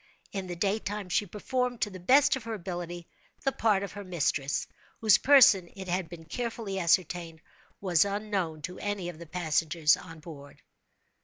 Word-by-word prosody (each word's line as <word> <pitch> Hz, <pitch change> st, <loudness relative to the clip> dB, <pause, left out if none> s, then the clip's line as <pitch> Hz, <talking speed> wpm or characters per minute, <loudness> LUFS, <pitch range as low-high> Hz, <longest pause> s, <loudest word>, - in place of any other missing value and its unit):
In 195 Hz, -2 st, -4 dB
the 175 Hz, -, -5 dB
daytime 200 Hz, +1 st, -2 dB
she 205 Hz, +4 st, +1 dB
performed, 245 Hz, +5 st, -2 dB
to 210 Hz, -, 0 dB
the 185 Hz, -, -9 dB
best 270 Hz, +12 st, +5 dB
of 255 Hz, -4 st, -7 dB
her 225 Hz, -1 st, -3 dB
ability, 175 Hz, -2 st, -6 dB, 0.4 s
the 270 Hz, -, +2 dB
part 210 Hz, -6 st, +1 dB
of 200 Hz, -, -5 dB
her 205 Hz, 0 st, -8 dB
mistress—whose 175 Hz, +4 st, 0 dB
person, 235 Hz, -10 st, +6 dB
it 190 Hz, -1 st, -8 dB
had 180 Hz, -1 st, -1 dB
been 165 Hz, -2 st, -10 dB
carefully 225 Hz, -2 st, -4 dB
ascertained, 170 Hz, -1 st, +1 dB, 0.4 s
was 180 Hz, -5 st, +3 dB
unknown 200 Hz, -6 st, -2 dB
to 180 Hz, 0 st, -6 dB
any 205 Hz, -4 st, -3 dB
of 170 Hz, -2 st, -10 dB
the 170 Hz, -, -10 dB
passengers 160 Hz, -2 st, +2 dB
on 165 Hz, 0 st, -11 dB
board. 145 Hz, -3 st, -12 dB
185 Hz, 165 wpm, -29 LUFS, 170-210 Hz, 0.4 s, person